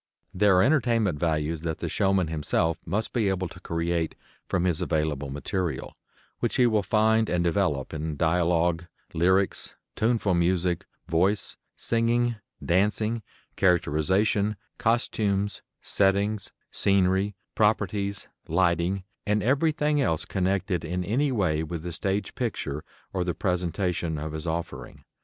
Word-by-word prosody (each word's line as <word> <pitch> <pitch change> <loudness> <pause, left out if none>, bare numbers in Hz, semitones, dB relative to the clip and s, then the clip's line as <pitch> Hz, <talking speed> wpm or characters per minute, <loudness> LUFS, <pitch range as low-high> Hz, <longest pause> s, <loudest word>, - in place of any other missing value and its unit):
There 100 0 +4
are 90 - +6
entertainment 115 - +2
values 80 -1 0
that 80 -1 -2
the - - -4
showman 95 -2 +2
himself 80 +1 0
must 105 +6 -1
be 110 -5 +2
able 95 -1 -1
to - - -12
create 85 0 -1 0.3
from 90 - 0
his 90 -4 +1
available 75 -3 -1
material, 85 +5 -3 0.4
which - - -1
he 125 - +5
will 110 -3 +3
find 110 +3 +2
and 90 -1 +1
develop 85 -6 0
in 75 -1 -3
dialogue, 85 +1 +2 0.3
lyrics, 95 +3 +1 0.2
tuneful 110 -4 +1
music, 90 0 +1 0.2
voice, 95 +5 +1 0.2
singing, 120 0 +1 0.3
dancing, 105 +5 +1 0.3
characterization, 95 +4 +2 0.2
costumes, 105 -4 0 0.2
settings, 100 +1 +2 0.2
scenery, 95 +1 +2 0.2
properties, 100 -2 +1 0.2
lighting, 85 +2 +1 0.2
and 105 0 +2
everything 150 +3 +2
else 80 - +1
connected 95 -2 0
in 90 +3 -2
any 130 +10 +1
way 90 -10 +1
with 80 0 -5
the 90 -1 -5
stage 100 +4 -2
picture 75 - -3 0.3
or 95 -2 0
the 90 -2 -2
presentation 90 -2 -1
of 75 +1 -4
his 80 +2 -5
offering. 85 +1 -5
95 Hz, 130 wpm, -26 LUFS, 85-105 Hz, 0.4 s, are